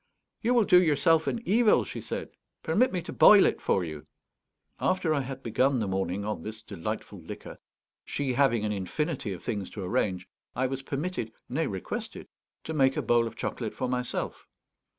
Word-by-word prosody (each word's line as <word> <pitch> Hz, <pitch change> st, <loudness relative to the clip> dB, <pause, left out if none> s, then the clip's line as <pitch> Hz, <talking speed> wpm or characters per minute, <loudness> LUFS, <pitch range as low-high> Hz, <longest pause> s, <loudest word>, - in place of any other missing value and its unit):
"You 240 Hz, +2 st, +2 dB
will 235 Hz, -, +5 dB
do 180 Hz, -3 st, +6 dB
yourself 160 Hz, 0 st, +3 dB
an 235 Hz, -, -1 dB
evil," 220 Hz, +2 st, +4 dB
she -, -, -6 dB
said. -, -, -5 dB, 0.3 s
"Permit 215 Hz, +11 st, +3 dB
me 180 Hz, -3 st, -2 dB
to -, -, -7 dB
boil 205 Hz, -2 st, +8 dB
it -, -, 0 dB
for 95 Hz, -, +1 dB
you." 75 Hz, -3 st, -7 dB, 0.7 s
After 185 Hz, -4 st, +1 dB
I 145 Hz, -, +1 dB
had 135 Hz, 0 st, -7 dB
begun 130 Hz, +4 st, +2 dB
the 110 Hz, -4 st, -1 dB
morning 95 Hz, +1 st, -2 dB
on 105 Hz, 0 st, -3 dB
this 110 Hz, +1 st, -7 dB
delightful 85 Hz, -, -5 dB
liquor, -, -, -9 dB, 0.4 s
she 140 Hz, -3 st, -2 dB
having 120 Hz, -5 st, +3 dB
an 105 Hz, -, 0 dB
infinity 110 Hz, -, -2 dB
of 90 Hz, -, -7 dB
things 105 Hz, -6 st, -3 dB
to 100 Hz, -, -7 dB
arrange, 90 Hz, 0 st, -1 dB, 0.3 s
I 130 Hz, -, +1 dB
was 135 Hz, +1 st, -2 dB
permitted, 140 Hz, -3 st, -3 dB, 0.2 s
nay 160 Hz, +5 st, -1 dB
requested, 95 Hz, -2 st, -5 dB, 0.3 s
to 160 Hz, -, -5 dB
make 135 Hz, -3 st, +3 dB
a -, -, 0 dB
bowl 120 Hz, -1 st, +3 dB
of -, -, -8 dB
chocolate -, -, -4 dB
for 130 Hz, -, -2 dB
myself. 125 Hz, -1 st, -3 dB
130 Hz, 185 wpm, -28 LUFS, 105-160 Hz, 0.7 s, boil